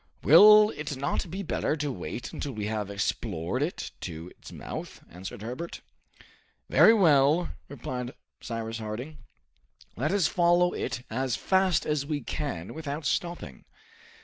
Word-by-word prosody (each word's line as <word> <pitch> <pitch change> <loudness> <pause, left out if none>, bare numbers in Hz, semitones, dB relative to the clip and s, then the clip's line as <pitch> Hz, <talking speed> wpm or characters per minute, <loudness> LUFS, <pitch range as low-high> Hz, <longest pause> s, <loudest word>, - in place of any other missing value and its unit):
"Will 210 0 +8
it 145 -2 -5
not 140 +6 -2
be 190 +4 -4
better 155 - -1
to 145 -1 -2
wait 120 -1 -6
until 140 - -4
we 105 -2 -4
have 105 -2 -2
explored 100 +1 -2
it 155 +5 -3
to 85 0 -6
its - - -12
mouth?" - - -7
answered 95 +4 -8
Herbert. 125 +9 -6 0.9
"Very - - +8
well," 160 -5 +4 0.2
replied 125 -2 -5 0.3
Cyrus 115 -1 -4
Harding. 120 +8 -6 0.8
"Let 135 - -1
us 195 -4 +2
follow 175 0 +3
it 125 - -4
as 130 +2 -1
fast 190 -2 +2
as 150 -2 0
we 145 0 -3
can 120 - -4
without 150 -1 -5
stopping." 175 +2 -3
140 Hz, 140 wpm, -28 LUFS, 115-170 Hz, 0.9 s, Will